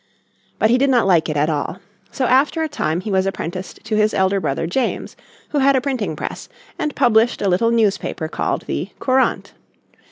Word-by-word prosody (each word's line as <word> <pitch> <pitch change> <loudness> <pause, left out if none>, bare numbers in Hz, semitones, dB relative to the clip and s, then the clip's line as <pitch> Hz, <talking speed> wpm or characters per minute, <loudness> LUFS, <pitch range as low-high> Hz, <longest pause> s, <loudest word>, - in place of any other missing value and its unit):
But 220 - +3
he 250 - +4
did 275 +1 +3
not 245 -5 +3
like 170 -4 +3
it 150 - -1
at 145 +1 +2
all. 155 +2 -2 0.3
So 260 - -1
after 275 +6 +2
a - - 0
time 175 - -2
he 210 - -5
was 190 0 +2
apprenticed 185 -1 -5
to 220 -1 -2
his 215 0 +2
elder 190 +1 +2
brother 150 -2 -2
James, 215 +10 -2 0.3
who 295 - 0
had 275 0 +4
a - - +4
printing 245 - -2
press, - - -6 0.3
and 300 -2 -2
published 230 +1 +3
a 200 - 0
little 190 +5 +2
newspaper 210 -8 0
called - - -2
the - - -3
Courant. 260 0 0
215 Hz, 195 wpm, -20 LUFS, 180-255 Hz, 0.3 s, he